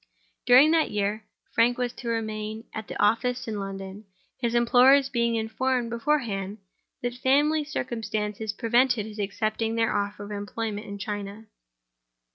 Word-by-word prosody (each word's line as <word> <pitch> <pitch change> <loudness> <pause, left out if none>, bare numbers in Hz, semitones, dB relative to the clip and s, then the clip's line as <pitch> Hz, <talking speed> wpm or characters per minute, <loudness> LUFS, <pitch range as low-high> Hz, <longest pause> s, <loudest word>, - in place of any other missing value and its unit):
During 260 +5 +7
that 325 -1 +3
year, 210 +1 -2 0.3
Frank 240 +2 +3
was 245 -1 -1
to 240 - -9
remain 220 -1 -3
at 220 -1 -6
the - - -7
office 235 +4 +1
in 215 -2 -3
London; 195 +1 -7 0.3
his 235 -2 -1
employers 255 +3 +5
being 235 -2 +1
informed 235 +2 -1
beforehand 225 -6 -1 0.5
that 245 0 -1
family 290 +5 +2
circumstances 220 -6 -3
prevented 235 0 +2
his 215 0 -9
accepting 215 +2 -1
their 225 -1 +1
offer 205 0 -2
of 205 - -8
employment 210 +1 -4
in 200 0 -6
China. 205 +1 -5
225 Hz, 140 wpm, -26 LUFS, 210-245 Hz, 0.5 s, During